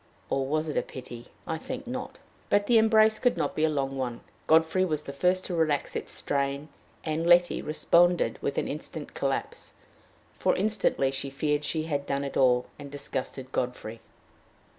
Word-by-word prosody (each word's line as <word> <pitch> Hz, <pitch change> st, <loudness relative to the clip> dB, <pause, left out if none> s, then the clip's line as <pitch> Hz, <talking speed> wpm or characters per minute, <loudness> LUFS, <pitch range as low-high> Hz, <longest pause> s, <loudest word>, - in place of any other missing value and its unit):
Or 135 Hz, -1 st, 0 dB
was 155 Hz, +2 st, 0 dB
it 150 Hz, -, -3 dB
a -, -, +4 dB
pity? 120 Hz, -2 st, -9 dB, 0.2 s
I 160 Hz, 0 st, -3 dB
think 260 Hz, +7 st, -6 dB
not. 255 Hz, +1 st, -5 dB, 0.3 s
But 205 Hz, 0 st, +3 dB
the 230 Hz, +1 st, +5 dB
embrace 220 Hz, -1 st, +5 dB
could 245 Hz, -1 st, +2 dB
not -, -, -1 dB
be 155 Hz, -, -1 dB
a 160 Hz, -, +4 dB
long 135 Hz, -2 st, -1 dB
one. 125 Hz, -3 st, -3 dB, 0.3 s
Godfrey 160 Hz, +3 st, +4 dB
was 155 Hz, -5 st, -1 dB
the 140 Hz, -, -7 dB
first 180 Hz, +6 st, +1 dB
to 180 Hz, -, -4 dB
relax 155 Hz, -4 st, 0 dB
its -, -, -4 dB
strain, 140 Hz, +1 st, -2 dB, 0.3 s
and 160 Hz, +1 st, -1 dB
Letty 175 Hz, 0 st, +5 dB
responded 175 Hz, +3 st, +3 dB
with -, -, -2 dB
an -, -, 0 dB
instant -, -, -5 dB
collapse; -, -, -3 dB, 0.7 s
for -, -, +2 dB
instantly 200 Hz, -10 st, +1 dB
she 135 Hz, +1 st, -3 dB
feared 150 Hz, +2 st, -1 dB
she 155 Hz, +1 st, -1 dB
had 145 Hz, -3 st, -2 dB
done 140 Hz, 0 st, -1 dB
it 140 Hz, -, -5 dB
all, 125 Hz, -1 st, +4 dB
and 145 Hz, -1 st, -8 dB
disgusted 135 Hz, -2 st, -5 dB
Godfrey. 120 Hz, -3 st, -3 dB
150 Hz, 180 wpm, -28 LUFS, 135-175 Hz, 0.7 s, the